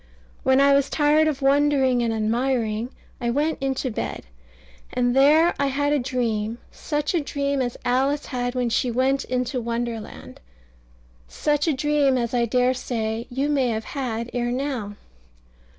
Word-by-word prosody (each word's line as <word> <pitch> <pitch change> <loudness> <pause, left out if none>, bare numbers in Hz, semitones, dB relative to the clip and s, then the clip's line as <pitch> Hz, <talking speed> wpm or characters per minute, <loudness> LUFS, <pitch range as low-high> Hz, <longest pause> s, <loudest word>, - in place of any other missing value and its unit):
When 265 0 +3
I 280 0 +5
was 280 0 +2
tired 305 +1 +3
of 285 -3 -2
wondering 275 -2 +3
and 230 -1 0
admiring, 225 0 0 0.3
I 240 - 0
went 295 +5 0
into 265 -1 -1
bed; - - -4 0.7
and 245 0 +1
there 305 +5 +5
I 280 - +2
had 285 +2 0
a 295 - +2
dream 230 -3 -2
such 295 0 -2
a 340 - +1
dream 280 0 -1
as 245 -1 -3
Alice 270 +4 +1
had 245 -1 -3
when 245 -2 0
she 245 - +1
went 265 +3 +1
into 250 0 -2
Wonderland 235 -1 -5 0.9
such 295 - 0
a 315 - +3
dream 280 -1 +2
as 235 -1 -2
I 240 -1 +2
dare 250 +2 +2
say 230 -2 -3
you 270 +3 -1
may 280 -4 +1
have 220 -2 -2
had 240 -4 -4
ere 240 0 -1
now. 250 -6 -3
255 Hz, 160 wpm, -23 LUFS, 240-280 Hz, 0.9 s, I